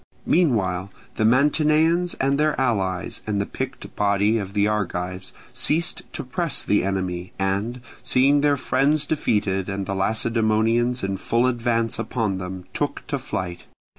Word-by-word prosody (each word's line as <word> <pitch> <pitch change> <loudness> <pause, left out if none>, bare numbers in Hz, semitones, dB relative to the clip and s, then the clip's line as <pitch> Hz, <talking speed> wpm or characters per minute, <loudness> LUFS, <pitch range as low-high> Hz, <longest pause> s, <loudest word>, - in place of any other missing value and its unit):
Meanwhile 100 - +1 0.3
the - - +1
Mantineans 155 +7 +3
and 140 +1 +1
their 155 -1 +1
allies 95 -8 -1
and 105 -2 0
the 100 - 0
picked - - -6
body 105 +2 +2
of 100 -1 -6
the 105 0 +2
Argives 95 -3 -2 0.2
ceased 165 +3 +1
to - - -4
press 145 +4 -1
the 105 - +2
enemy, 95 -2 -3
and 100 +6 -1 0.2
seeing 135 +3 +3
their 145 -1 +3
friends 140 +3 +1
defeated 100 - 0
and 100 0 -3
the 95 - -3
Lacedaemonians 115 +3 +1
in 95 0 -1
full 115 +5 +1
advance 115 -2 0
upon 110 -4 -1
them, 90 -1 -6
took - - -2
to - - -1
flight. 90 -2 -5
110 Hz, 145 wpm, -23 LUFS, 95-130 Hz, 0.3 s, Mantineans